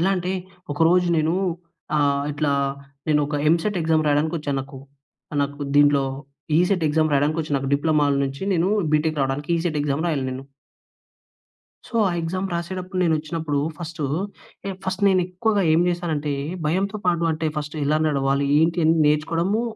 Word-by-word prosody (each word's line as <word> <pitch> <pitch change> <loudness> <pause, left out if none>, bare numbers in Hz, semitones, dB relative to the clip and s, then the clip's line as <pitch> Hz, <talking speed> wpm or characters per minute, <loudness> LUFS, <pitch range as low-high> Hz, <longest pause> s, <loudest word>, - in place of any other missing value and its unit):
ఎలా 190 +3 +2
అంటే 180 +1 -2 0.4
ఒకరోజు 170 +4 +3
నేను 160 +2 +1 0.6
ఆహ్, 140 -1 +2
ఇట్లా 145 -1 0 0.6
నేను 150 -1 +3
ఒక 150 - -5 0.2
ఎంసెట్ 180 +4 +1
ఎగ్జామ్ 160 -1 +2
రాయడానికొచ్చా 150 0 0
నాకు, 135 0 -9 0.6
నాకు 145 +1 -4 0.2
దీంట్లో 145 -1 +5 0.5
ఈసెట్ 180 -1 +2
ఎగ్జామ్ 155 0 +2
రాయడానికొచ్చిన. 150 +1 0
నాకు 135 +1 -3
డిప్లొమాల 145 -1 +2
నుంచి 135 +5 -5
నేను 175 +3 +2 0.3
బీటెక్ 155 0 +1
రావడానికి 135 +4 -2
ఈసెట్ 165 -3 -1
ఎగ్జామ్ 145 +3 -1
రాయాలి 145 -5 0
నేను. 130 +1 -6 1.4
సో - - -18
ఆ - - +1
ఎగ్జామ్స్ 185 +3 -3
రాసేటప్పుడు 185 +2 -4
నేనొచ్చినప్పుడు 155 -2 -1 0.2
ఫస్టు. 170 -2 -6 0.8
ఫస్ట్ 190 +1 -3
నేను 185 -2 +4
ఎక్కువగా 205 +3 0
ఏం 165 - +4
చేశాను 175 -2 -2
అంటే 145 0 -2 0.3
భయంతో 195 +6 0
పాటు, 170 -1 +2
అంటే 160 0 -2
ఫస్ట్ 150 +1 -4
ఎలా 155 +2 +2
నడవాలి 140 -1 +1
ఏంటి 165 0 +2 0.2
నేర్చుకోవడము 165 +8 +1
160 Hz, 145 wpm, -23 LUFS, 145-175 Hz, 1.4 s, దీంట్లో